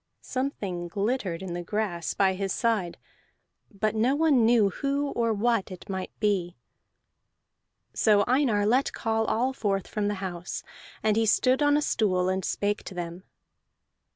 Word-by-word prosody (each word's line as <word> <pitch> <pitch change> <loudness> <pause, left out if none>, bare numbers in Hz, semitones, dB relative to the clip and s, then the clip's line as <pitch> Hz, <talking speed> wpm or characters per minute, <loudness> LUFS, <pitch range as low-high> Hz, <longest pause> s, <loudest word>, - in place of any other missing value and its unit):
Something 200 -10 -3
glittered 195 -2 -2
in 180 -2 -5
the 175 - -3
grass 175 -2 -2
by 190 -1 +3
his 195 0 -3
side, 215 -7 0 0.7
but 215 +1 -1
no 235 +5 +2
one 290 -7 +4
knew 225 -4 +4
who 280 +5 -1
or 230 -1 0
what 225 -1 +1
it 185 -2 -10
might 190 -1 -3
be. 190 - 0 1.4
So 205 -2 +4
Einar 245 -6 +2
let 250 +6 +2
call 225 0 0
all 250 +5 0
forth 200 -6 -1
from 210 -1 -2
the 205 - -1
house, 180 -2 -5 0.4
and 215 -1 +3
he 225 0 +2
stood 255 +6 +3
on 290 0 +4
a 300 - 0
stool, 185 -8 +1
and 190 0 -1
spake 205 +3 -1
to 190 - -8
them. 175 +1 -6
210 Hz, 155 wpm, -27 LUFS, 190-235 Hz, 1.4 s, one